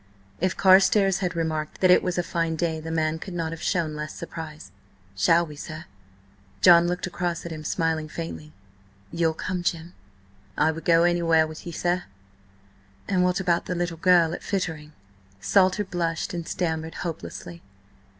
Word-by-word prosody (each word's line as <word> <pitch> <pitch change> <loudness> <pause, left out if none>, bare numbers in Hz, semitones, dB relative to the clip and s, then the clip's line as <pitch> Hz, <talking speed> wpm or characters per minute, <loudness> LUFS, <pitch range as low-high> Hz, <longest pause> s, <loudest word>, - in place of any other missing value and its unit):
If 185 +1 0
Carstares 195 0 +5
had 180 -2 -2
remarked 155 -2 -3
that 185 -1 +5
it - - +6
was 180 -1 -2
a 175 - +1
fine 165 -1 -1
day 160 -1 -1
the 160 +1 -7
man 160 0 0
could 185 +1 -7
not 165 -2 -2
have 165 - -7
shown 160 -4 -1
less 150 0 -6
surprise. 160 -9 -8 0.4
"Shall 165 - +3
we, 150 -2 -10
sir?" 155 +1 -8 0.7
John 175 -1 +7
looked 180 0 -2
across 175 -1 -3
at 170 - -6
him, 155 -1 -6
smiling 160 0 -1
faintly. 155 -2 -7 0.6
"You'll 165 -1 0
come, 180 +2 -3
Jim?" 170 0 -3 0.6
"I 160 - +3
would 165 +1 -8
go 165 0 +5
anywhere 170 -2 +3
with 155 +2 -9
ye, - - -4
sir." 175 +1 -1 1.0
"And 185 -2 +2
what 180 +1 +1
about 175 -3 0
that 180 - -2
little 175 -1 -2
girl 170 -1 +4
at - - -6
Fittering?" 160 -6 -3 0.5
Salter 190 - +3
blushed 170 -4 -2
and 170 -1 -5
stammered 160 -2 -2
hopelessly. 170 0 -7
170 Hz, 170 wpm, -25 LUFS, 160-180 Hz, 1.0 s, John